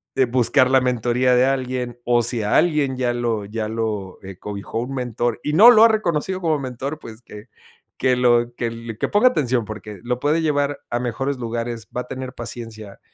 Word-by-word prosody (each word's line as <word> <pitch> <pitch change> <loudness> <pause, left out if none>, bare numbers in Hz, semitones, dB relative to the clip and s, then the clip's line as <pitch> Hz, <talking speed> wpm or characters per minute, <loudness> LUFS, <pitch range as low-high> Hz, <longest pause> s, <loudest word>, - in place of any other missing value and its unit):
eh, 130 - +3
buscar 130 +2 +3
la 130 -1 +5
mentoría 125 0 +1
de 125 +1 +4
alguien, 125 -2 -2
o 120 -1 +2
si 120 -1 0
a 105 - 0
alguien 150 -6 +1
ya 125 -2 0
lo 115 -4 -2
ya 110 +1 -4
lo, 110 -4 -4
eh, 95 -1 -9
cobijó 105 +2 -5
un 125 +3 -4
mentor, 120 -2 -2
y 150 - -2
no 215 +9 +9
lo 220 -1 +7
ha - - +9
reconocido 190 -3 -1
como 160 -3 +1
mentor, 135 +3 -5
pues 115 -2 -11
que 105 -2 -12 0.5
que 125 -1 +2
lo 120 -1 +3
que - - -3
l 115 -1 -7
que - - -1
ponga 225 +5 +4
atención 130 - 0
porque 105 -1 -9
lo 125 +1 -2
puede 150 +4 +1
llevar 145 -2 0
a 120 - -1
mejores 130 +3 -2
lugares, 115 -1 -4
va 125 - -1
a 125 - -11
tener 130 -1 -6
paciencia, 115 -3 -8
125 Hz, 205 wpm, -21 LUFS, 115-135 Hz, 0.5 s, no